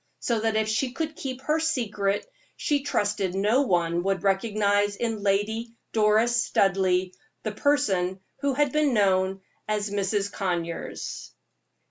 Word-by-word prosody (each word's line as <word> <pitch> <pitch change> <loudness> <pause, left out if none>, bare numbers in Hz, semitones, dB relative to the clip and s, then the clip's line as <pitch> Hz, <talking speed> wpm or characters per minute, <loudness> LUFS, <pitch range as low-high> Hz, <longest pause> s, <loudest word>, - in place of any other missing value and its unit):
So 235 -2 0
that 220 0 0
if 220 0 +1
she 245 +4 0
could 315 +1 -3
keep 260 -2 -5
her 305 +3 +1
secret, 210 -10 0 0.3
she 290 -2 +1
trusted 205 -8 -1
no 210 +7 +3
one 175 -8 +1
would 190 -1 -1
recognize 205 0 +2
in 225 -1 -2
Lady 220 +4 0 0.2
Doris 220 +2 +3
Studleigh 185 -1 +2 0.3
the - - -2
person 195 -11 +1 0.2
who 280 -1 0
had 290 -1 +2
been 300 -3 +2
known 190 -2 +2 0.3
as 210 -1 -1
Mrs. 200 0 0
Conyers. 170 -3 -4
210 Hz, 135 wpm, -26 LUFS, 195-240 Hz, 0.3 s, no